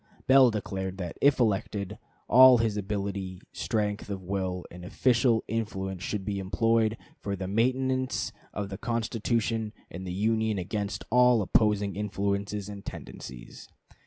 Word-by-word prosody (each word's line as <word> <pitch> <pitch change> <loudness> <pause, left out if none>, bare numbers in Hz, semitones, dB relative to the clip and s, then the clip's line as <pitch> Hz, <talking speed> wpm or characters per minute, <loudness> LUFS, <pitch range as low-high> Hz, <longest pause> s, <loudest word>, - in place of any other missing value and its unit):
Bell 130 -1 +7
declared 95 -3 -4
that, 90 -3 -5
if 140 -1 +4
elected, 100 -3 -1 0.3
all 130 +1 +8
his 115 -2 +1
ability, 100 -2 -3
strength 105 -2 -2
of 95 -2 -4
will, 90 -1 -3
and 90 +1 -10
official 120 +4 +2
influence 95 -4 -3
should 95 +1 -3
be 100 -1 -2
employed 110 +3 +1 0.2
"for 100 -1 -3
the 95 -1 -5
maintenance 130 +5 0 0.2
of 100 -1 -4
the 100 0 -6
Constitution 115 -1 -1 0.2
and 95 +2 -7
the - - -3
Union 110 +2 +1
against 100 +3 -3
all 125 -2 +5
opposing 105 -1 +2
influences 100 0 -2
and 100 -1 -8
tendencies." 60 -1 -9
105 Hz, 135 wpm, -28 LUFS, 95-115 Hz, 0.3 s, all